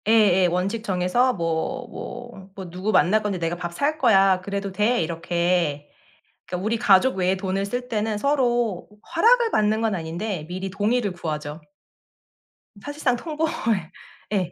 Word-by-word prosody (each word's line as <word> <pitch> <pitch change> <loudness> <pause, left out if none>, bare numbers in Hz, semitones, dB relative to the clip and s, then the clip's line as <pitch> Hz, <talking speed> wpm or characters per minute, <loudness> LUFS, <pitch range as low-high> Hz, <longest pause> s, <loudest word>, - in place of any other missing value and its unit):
예예. 205 -5 +5
원칙 190 +6 -1
정해서 195 +6 +1
뭐 170 +9 -2
뭐 215 -6 -9
뭐 190 -2 -7
"누구 185 +4 -2
만날 215 +2 +4
건데 205 -3 -2
내가 170 0 -2
밥 175 0 -5
살 300 - -1
거야. 195 -7 +4
그래도 200 +1 -4
돼?" 210 +4 +1
이렇게. 170 -2 -1 0.6
그러니까 180 +2 -4
우리 225 +2 +1
가족 215 +2 +4
외에 185 0 +1
돈을 190 +1 -2
쓸 245 +5 -4
때는 215 -1 -1
서로 240 -7 0 0.3
허락을 465 +5 +5
받는 215 - +2
건 225 -2 0
아닌데 170 +1 -4
미리 185 +2 -4
동의를 205 +2 0
구하죠. 155 -3 -5 1.2
사실상 290 0 -1
통보해 315 +5 -2 0.9
예. 185 -4 0
195 Hz, 290 characters per minute, -23 LUFS, 180-235 Hz, 1.2 s, 예예